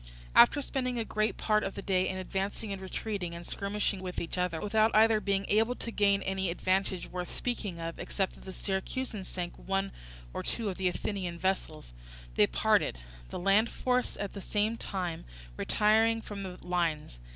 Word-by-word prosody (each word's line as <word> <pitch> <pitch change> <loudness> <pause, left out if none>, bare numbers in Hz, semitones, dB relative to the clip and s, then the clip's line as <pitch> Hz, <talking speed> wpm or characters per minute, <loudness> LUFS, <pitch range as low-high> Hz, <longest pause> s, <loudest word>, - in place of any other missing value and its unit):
After 290 - +7
spending 255 -3 -1
a 230 - -1
great 215 0 0
part 215 -1 +2
of 195 - -3
the - - -4
day 185 -1 +2
in 185 - -3
advancing 195 +3 -3
and 195 - -6
retreating 190 -2 -3
and 170 0 -8
skirmishing 200 0 -1
with 180 -1 -4
each 165 - -4
other, 180 -3 0
without 215 +2 +3
either 220 0 +6
being 195 0 +1
able 225 +4 +3
to 230 - -5
gain 200 -2 +3
any 190 -1 -1
advantage 185 +1 0
worth 180 -1 -5
speaking 210 -8 -3
of, 165 0 -5
except 195 -2 -1
that - - -15
the 190 - -6
Syracusans 195 +2 -3
sank 175 -1 -4
one 195 0 -1 0.4
or - - -2
two 225 -3 -1
of 185 - -4
the 190 - +2
Athenian 180 -1 -2
vessels, 185 - -2 0.4
they - - +5
parted, - - +2 0.3
the - - -5
land 195 +5 +4
force 250 0 0
at 200 - -4
the 200 - -6
same 210 +3 0
time 180 -7 -3 0.3
retiring 220 - +3
from 205 -2 -7
the 185 -2 -6
lines. 165 - -1
195 Hz, 185 wpm, -31 LUFS, 180-215 Hz, 0.4 s, After